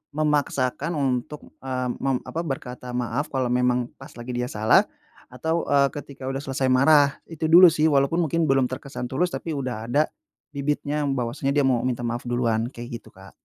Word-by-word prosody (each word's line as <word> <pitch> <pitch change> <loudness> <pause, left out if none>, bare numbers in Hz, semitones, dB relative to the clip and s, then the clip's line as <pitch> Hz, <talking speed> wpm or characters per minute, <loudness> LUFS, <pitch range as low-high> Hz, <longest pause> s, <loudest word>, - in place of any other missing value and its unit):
memaksakan 150 0 0
untuk, 140 +1 -2
eee, 130 -1 -3
meng 135 -2 0
apa 165 - -3
berkata 125 -4 -6
maaf 125 +4 -2
kalau 130 -2 0
memang 125 -1 +1
pas - - -11
lagi 120 +1 -7
dia 125 0 -1
salah, 110 +1 +4 0.5
atau, 160 +7 -2
eee, 140 -1 +4
ketika 140 -2 -8
udah 135 0 -2
selesai 135 0 -1
marah. 140 +2 +5
Itu 160 -1 -3
dulu 180 +1 +10
sih, 155 0 +2
walaupun 140 +5 +2
mungkin 165 +1 0
belum 135 -2 +3
terkesan 130 -1 -5
tulus 175 +7 0
tapi 160 -3 -4
udah 125 -5 -4
ada 145 +5 +3 0.5
bibitnya 145 +1 -1
bahwasanya 135 +1 -1
dia 145 - +3
mau 125 -3 +2
minta 120 -1 -2
maaf 120 +1 -3
duluan, 120 -2 0
kayak 120 -1 -7
gitu, - - -21
Kak. - - -15
135 Hz, 180 wpm, -24 LUFS, 125-145 Hz, 0.5 s, dulu